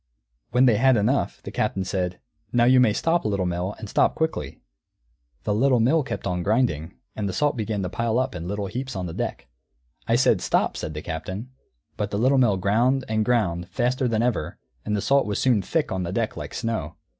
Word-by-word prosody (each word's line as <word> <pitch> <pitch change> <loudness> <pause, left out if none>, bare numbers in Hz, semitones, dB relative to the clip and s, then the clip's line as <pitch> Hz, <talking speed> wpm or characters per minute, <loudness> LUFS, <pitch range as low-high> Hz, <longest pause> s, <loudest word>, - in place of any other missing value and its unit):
When 125 +2 +4
they 115 -5 +4
had 130 +1 +4
enough, 120 +7 0
the - - -7
Captain 95 - -1
said, 90 -1 -2 0.3
"Now 120 -1 +3
you 125 +1 +6
may 125 -4 +5
stop, 165 +9 +1
Little 100 -3 0
Mill, 90 +3 -2
and 110 - -7
stop - - +2
quickly." 160 0 -2 0.8
The 105 - 0
Little 125 +3 +3
Mill 140 +8 +3
kept 140 - -5
on 90 -2 -1
grinding; 100 - 0 0.2
and 105 -2 -2
the - - -4
salt 145 +10 +1
began 110 -3 -2
to 90 - -2
pile 115 +3 -1
up 130 -2 0
in 85 -1 -6
little 100 +1 -2
heaps 125 +5 -5
on 95 -1 -3
the 85 - -5
deck. - - -4 0.6
"I - - +3
said, - - +3
'Stop,'" - - +1
said 75 - -5
the 75 - -5
Captain. 95 +8 -5 0.5
But 105 - -2
the 100 - -2
Little 130 +5 +3
Mill 110 -6 +3
ground, 120 +8 +2
and 110 0 +1
ground, 95 -8 0
faster 130 +1 0
than 115 -1 +1
ever, 115 -11 -1 0.3
and 105 - -1
the - - -1
salt 140 0 +3
was 105 - -1
soon 120 -6 +3
thick 155 - -1
on 95 -1 -1
the 85 -1 -3
deck 115 +3 -1
like - - -7
snow. 110 -10 -3
110 Hz, 215 wpm, -24 LUFS, 95-125 Hz, 0.8 s, you